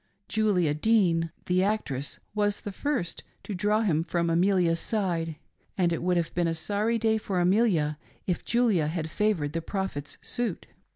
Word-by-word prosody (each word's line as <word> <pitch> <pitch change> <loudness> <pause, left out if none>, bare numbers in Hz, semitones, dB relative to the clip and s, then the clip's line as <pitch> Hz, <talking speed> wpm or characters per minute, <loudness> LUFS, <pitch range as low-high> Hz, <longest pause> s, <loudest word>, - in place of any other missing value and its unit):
Julia 195 -8 +2
Dean, 165 -2 +2
the 180 +1 +2
actress, 170 -10 -1 0.2
was 205 -1 0
the 205 - -5
first 245 - -2 0.2
to 210 - -5
draw 210 +3 +2
him 165 -7 +2
ffotti 170 0 0
Amelia's 175 -1 +3
side, 170 -7 -1 0.4
and 175 -3 +2
it 165 - -2
would 180 0 +2
have 170 -1 -1
been 175 -1 +1
a 165 - 0
sorry 210 +7 0
day 220 -1 +2
for 195 -3 -2
Amelia 175 -6 +2 0.3
if 180 -3 -1
Julia 220 -10 +2
had 160 0 -3
favored 185 -9 0
the 165 - -1
Prophet's 165 -6 -4
suit. 235 -7 -3
180 Hz, 165 wpm, -27 LUFS, 165-210 Hz, 0.4 s, Amelia's